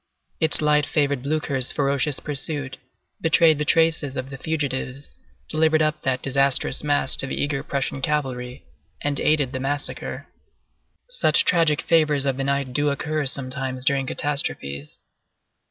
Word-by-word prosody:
Its 160 -1 +6
light 150 0 +3
favored 140 -4 0
Blücher's 140 -2 -1
ferocious 140 0 0
pursuit, 145 -1 -1 0.4
betrayed 160 -1 +4
the - - 0
traces 160 -4 +2
of 130 +1 -5
the 135 - -7
fugitives, 140 -3 -3 0.3
delivered 155 0 +2
up 155 0 -1
that 130 -1 -1
disastrous 135 0 +1
mass 145 -2 +3
to 140 - -2
the - - -4
eager 145 -1 -1
Prussian 135 -1 -3
cavalry, 130 -3 -3 0.4
and 145 -1 -1
aided 150 -4 +1
the 130 - -4
massacre. 145 +2 -4 0.8
Such - - +2
tragic 165 -5 +2
favors 150 -4 +2
of 135 -2 -1
the 135 - -2
night 140 -2 -1
do 145 +2 +1
occur 150 +1 -2
sometimes 130 -1 -3
during 135 -1 +1
catastrophes. 75 - -3
140 Hz, 140 wpm, -23 LUFS, 135-150 Hz, 0.8 s, Its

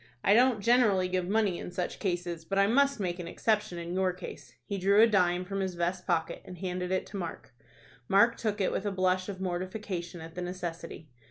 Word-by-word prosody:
"I 200 - +5
don't 240 -1 +4
generally 215 -5 +4
give 180 -1 -1
money 205 -4 +1
in - - -6
such 180 0 -4
cases, 175 -3 -2
but 195 +4 -3
I 200 - +5
must 275 +4 +3
make 180 -2 -2
an 175 - -5
exception 210 0 0
in 170 0 -5
your 185 0 +1
case." 180 0 -10
He 200 -1 -3
drew 200 +3 +4
a 225 - +9
dime 180 -4 +2
from 195 +1 -3
his 190 -2 -2
vest 175 +1 -2
pocket 165 -3 0
and 180 - -10
handed 180 0 -3
it 185 - 0
to 200 - -7
Mark. 170 -7 -6 0.5
Mark 230 +5 +5
took 215 -3 -2
it 190 - +1
with 205 - -2
a - - 0
blush 185 0 +1
of 190 -2 -6
mortification 185 -1 -4
at 160 0 -9
the 180 - -5
necessity. 170 -4 -6
185 Hz, 220 wpm, -30 LUFS, 175-200 Hz, 0.5 s, a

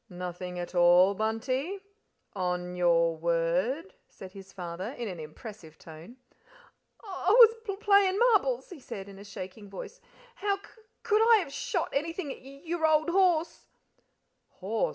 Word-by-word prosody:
"Nothing 180 0 -6
at 175 +1 -5
all, 175 +2 +6
Bunty? 255 - -2 0.6
On 180 -2 -2
your 170 -2 +3
word?" 170 - 0 0.2
said 190 -1 -11
his 195 0 -12
father, 185 +4 -6
in 235 - -4
an 180 -4 -6
impressive 160 +1 -10
tone. 165 +10 -13 0.9
"I 380 -3 -3
was 455 +1 +8
p 400 -3 -4
playin' 400 -2 +3
marbles," 385 - +2
he 350 - -9
said, 195 -6 -8
in 195 -1 -12
a - - -10
shaking 200 0 -9
voice. 340 - -9 0.3
"How 405 -3 -1
c 395 - -16
c - - -15 0.3
could 430 -1 +3
I 465 - +9
have 340 -9 -3
sh - - -5
shot 360 -8 0
anything 325 +1 -2
at - - -9
y - - -20
y 275 +1 -12
your 330 -1 0
old 310 +1 +3
horse?" 350 -3 +1
225 Hz, 160 wpm, -29 LUFS, -, 0.9 s, I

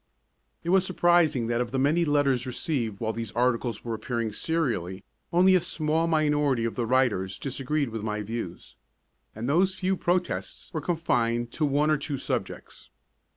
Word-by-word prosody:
It 170 - -3
was 190 -1 +5
surprising 175 -8 +3
that 120 +1 0
of 120 - -2
the 135 - -2
many 150 +6 +2
letters 140 -4 +2
received 120 -5 -2
while 110 -1 -1
these 115 -1 -5
articles 120 -2 0
were 115 - -2
appearing 115 -1 -3
serially, 110 - -1 0.3
only 185 +2 +5
a 185 - +4
small 160 +1 0
minority 150 -6 +2
of 115 - -2
the 120 -2 -2
writers 110 -7 +1
disagreed 135 +1 -2
with 110 -1 -5
my 105 0 -3
views, 105 -5 -6 0.6
and 110 +3 -4
those 185 +6 +2
few 190 0 0
protests 180 +1 -2
were 155 - -2
confined 120 -8 0
to 155 - 0
one 145 +2 +2
or 155 - +3
two 140 0 -4
subjects. - - -5
135 Hz, 165 wpm, -27 LUFS, 115-160 Hz, 0.6 s, was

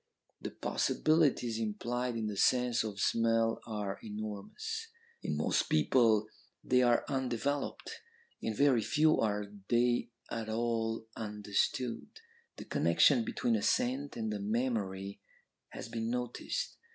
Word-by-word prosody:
The - - -4
possibilities 145 -8 +1
implied 120 +3 -2
in 115 -1 -2
the 105 -1 -3
sense 125 +2 +3
of 105 -3 -5
smell 115 +1 +2
are 105 -3 -3
enormous. 110 - -5 0.3
In - - -2
most - - +1
people 120 -8 +4 0.4
they 125 0 +3
are 120 -1 +3
undeveloped; 135 +1 -2 0.4
in 110 - -2
very 135 -2 +4
few 155 +7 +3
are 105 -1 0 0.2
they 120 0 +2 0.2
at 115 -1 -3
all 115 0 -1
understood. 105 +3 -1 0.5
The - - -8
connection 115 - +4
between 115 +1 0
a 105 - 0
scent 130 +6 0
and 110 -2 -2
a 105 - -3
memory 100 -3 -2 0.5
has - - -7
been 115 0 -3
noticed. 125 0 -3
115 Hz, 125 wpm, -32 LUFS, 110-125 Hz, 0.5 s, people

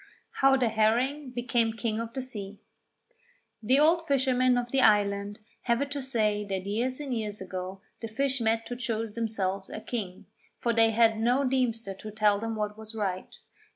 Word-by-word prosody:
HOW 270 0 +5
THE 245 -3 +2
HERRING 245 +6 +1
BECAME 240 -2 0
KING 225 -1 -2
OF 230 0 -5
THE 265 - -3
SEA 205 -5 -6 1.0
The 250 +5 +3
old 330 +2 +3
fishermen 255 -2 +3
of 245 0 -2
the 270 - +3
island 205 -1 +3 0.3
have 235 -1 +2
it 280 0 -2
to 285 -1 -3
say 215 -5 0
that 195 -2 -4
years 240 +6 -1
and 275 -4 -3
years 210 -2 -3
ago 185 0 -6 0.2
the 225 - -5
fish 265 +3 -1
met 225 0 +1
to 245 - -5
choose 225 -3 -3
themselves 200 -4 -2
a - - -6
king, 205 -6 -5 0.3
for 235 - 0
they 225 0 +5
had 225 0 +3
no 245 +5 +2
deemster 240 -6 0
to 215 - -7
tell 210 -1 +2
them 225 +1 -3
what 210 0 -3
was 220 +1 -8
right. 190 -4 -3
225 Hz, 185 wpm, -28 LUFS, 210-255 Hz, 1.0 s, HOW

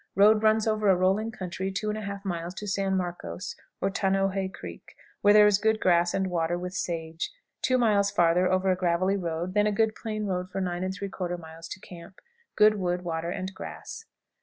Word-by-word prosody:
Road 210 +2 +6
runs 220 0 +3
over 215 -2 +2
a 190 - +6
rolling 190 +5 +1
country 190 -2 -4
2 200 +2 -2
1/2 200 -2 -4
miles 175 -1 -3
to 210 - -6
San 195 -1 0
Marcos, 180 +1 -4 0.2
or 195 - 0
Tanoje 195 -1 0
Creek, 90 - -10 0.3
where 205 - +6
there 210 0 +8
is 205 -1 +4
good 220 0 +2
grass 175 -2 +3
and 195 0 +1
water, 175 -1 0
with 180 +1 -5
sage. 165 -3 -3 0.3
Two 255 - +2
miles 210 -4 +3
farther 175 +2 +3
over 185 0 +2
a - - +2
gravelly 180 +2 +1
road, 175 -1 -3
then 210 +1 +3
a - - +2
good 220 +1 +2
plain 215 -2 -4
road 185 -2 -2
for 195 - -4
9 175 -2 -2
3/4 185 -1 -3
miles 165 0 -10
to 190 - -7
camp. 175 0 -12 0.4
Good 215 0 +5
wood, 180 -1 -1
water, 165 -1 -3
and 190 +1 -4
grass. 450 - -8
23. - - -54
190 Hz, 200 wpm, -27 LUFS, 175-205 Hz, 0.4 s, there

